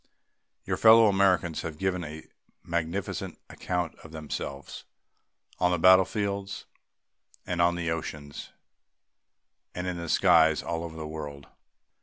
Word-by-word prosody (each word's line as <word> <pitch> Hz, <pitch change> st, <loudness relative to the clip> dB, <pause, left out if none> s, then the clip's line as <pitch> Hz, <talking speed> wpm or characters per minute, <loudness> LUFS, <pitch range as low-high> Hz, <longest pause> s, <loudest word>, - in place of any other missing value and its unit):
Your -, -, -2 dB
fellow 115 Hz, 0 st, +7 dB
Americans 95 Hz, -4 st, +2 dB
have 80 Hz, -2 st, -6 dB
given 90 Hz, 0 st, -1 dB
a 80 Hz, 0 st, -8 dB, 0.4 s
magnificent 85 Hz, +3 st, -3 dB
account 90 Hz, -2 st, -3 dB
of 80 Hz, -, -13 dB
themselves 75 Hz, -3 st, -6 dB, 0.8 s
on 90 Hz, -, +3 dB
the 90 Hz, -, +1 dB
battlefields 100 Hz, +2 st, +2 dB, 0.8 s
and 85 Hz, -1 st, -1 dB
on 85 Hz, 0 st, +3 dB
the 85 Hz, -2 st, -2 dB
oceans 75 Hz, -3 st, -6 dB, 1.3 s
and 90 Hz, -, -4 dB
in 90 Hz, -1 st, -3 dB
the 85 Hz, -1 st, -6 dB
skies 80 Hz, -1 st, +4 dB
all 85 Hz, -1 st, -3 dB
over 80 Hz, -1 st, -8 dB
the 80 Hz, -, -6 dB
world. 75 Hz, -2 st, -7 dB
85 Hz, 125 wpm, -27 LUFS, 80-90 Hz, 1.3 s, fellow